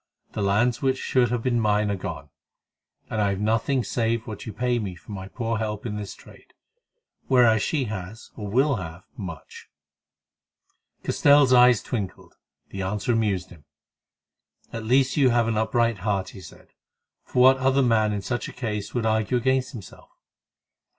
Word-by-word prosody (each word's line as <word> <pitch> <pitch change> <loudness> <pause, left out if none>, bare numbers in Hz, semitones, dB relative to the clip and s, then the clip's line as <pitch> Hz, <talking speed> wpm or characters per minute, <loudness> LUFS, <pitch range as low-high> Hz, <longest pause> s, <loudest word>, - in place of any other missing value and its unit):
The - - -4
lands 110 +5 +1
which 135 -1 +1
should 125 -2 +1
have 120 -1 -2
been 120 -2 +1
mine 105 -1 +1
are - - 0
gone, 95 - -7 0.8
and 110 - -2
I 100 - +2
have 100 -1 -2
nothing 115 +5 +1
save 115 -1 -1
what 110 -1 -8
you - - -4
pay 125 +1 0
me 100 -5 -5
for 85 - -14
my 95 -1 -6
poor 115 +1 -3
help 105 -1 -4
in 105 -3 -3
this 105 -2 -6
trade; - - -18 0.7
whereas 120 -4 +4
she 145 +2 0
has, 105 -1 -7
or 105 - -6
will 135 +4 +2
have, 90 -1 -8
much." 85 -6 -9 1.3
Castell's 140 -2 +4
eyes 125 -3 +6
twinkled; 100 -7 -5 0.4
the 95 - -6
answer 105 +6 -1
amused 100 -5 -1
him. 80 -5 -16 1.1
"At 115 -1 -5
least 130 +4 +2
you 135 -3 +5
have 120 -1 +2
an 115 - 0
upright 115 0 +1
heart," 95 -1 -1
he 95 - -12
said, 80 - -14 0.5
"for 125 - +1
what 130 +1 +7
other 135 +1 +2
man 110 -3 +2
in 100 -1 -3
such 120 +3 -3
a - - -11
case 105 -4 -4
would 120 -2 0
argue 110 +2 +1
against 130 +1 0
himself? 105 -7 -12
110 Hz, 170 wpm, -24 LUFS, 105-125 Hz, 1.3 s, what